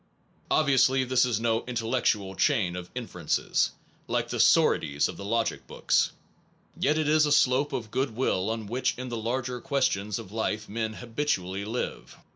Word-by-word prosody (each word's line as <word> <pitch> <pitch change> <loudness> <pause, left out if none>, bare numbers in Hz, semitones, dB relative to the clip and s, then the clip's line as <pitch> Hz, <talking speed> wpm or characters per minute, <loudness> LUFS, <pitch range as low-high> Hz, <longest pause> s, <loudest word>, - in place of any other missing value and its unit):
Obviously 135 -3 +3
this 130 0 +3
is 120 -4 0
no 115 0 0
intellectual 115 -5 0
chain 105 -12 +1
of 90 -1 -7
infer 115 -8 -7
ences, - - +1 0.4
like - - -1
the - - -3
sorites 75 -1 +4
of - - -7
the - - -8
logic 115 +3 -1
books. - - +1 0.6
Yet 150 +2 +1
it 155 -1 0
is 155 0 +4
a - - -1
slope 135 +1 +3
of 110 -3 -4
good 130 -4 -1
will 105 -5 0
on 110 -1 -3
which 120 +5 -1
in 125 0 -5
the 120 - -4
larger 125 +2 -3
questions 110 -8 0
of 95 - -9
life 110 -1 -2
men 110 +1 -3
habitually 105 -6 -2
live. 115 +4 -5
115 Hz, 170 wpm, -27 LUFS, 105-130 Hz, 0.6 s, sorites